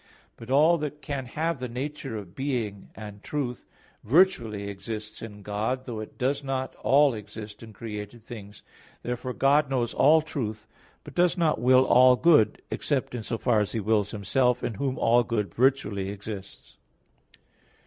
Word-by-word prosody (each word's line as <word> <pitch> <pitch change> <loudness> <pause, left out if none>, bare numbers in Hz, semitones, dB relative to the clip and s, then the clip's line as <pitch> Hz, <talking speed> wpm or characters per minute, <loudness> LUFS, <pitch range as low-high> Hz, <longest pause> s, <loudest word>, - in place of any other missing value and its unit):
But 115 - -12
all 155 +5 +5
that 150 0 -5
can 140 -4 -4
have 160 +3 -2
the 125 -1 -4
nature 135 -1 -5
of 95 -4 -9
being 120 -8 -3
and 105 -2 -9
truth 130 -3 -4 0.4
virtually 115 - +2
exists 105 +1 -7
in 105 -2 -9
God, 110 +6 -2
though 115 -4 -5
it 110 - -9
does 135 +3 0
not 135 -1 -3
all 140 0 +4
exist 105 0 -9
in 115 -1 -10
created 105 +1 -7
things. 105 -3 -10 0.4
Therefore 125 +1 -3
God 140 +2 +3
knows 120 -3 -1
all 155 +3 +5
truth; 110 -9 -4 0.4
but - - -11
does 180 +1 +2
not 160 -8 +1
will 130 +1 +5
all 125 0 +6
good, 150 - +4
except 135 -3 -1
in 120 - -3
so 115 +1 -3
far 115 -1 +2
as 105 - -1
He 115 - -1
wills 105 -1 +1
Himself, 125 +5 +1
in 120 - -1
Whom 130 +4 -2
all 120 +1 +4
good 105 -7 -2
virtually 115 -7 +1
exists. 100 -1 -9
120 Hz, 165 wpm, -27 LUFS, 105-135 Hz, 0.4 s, all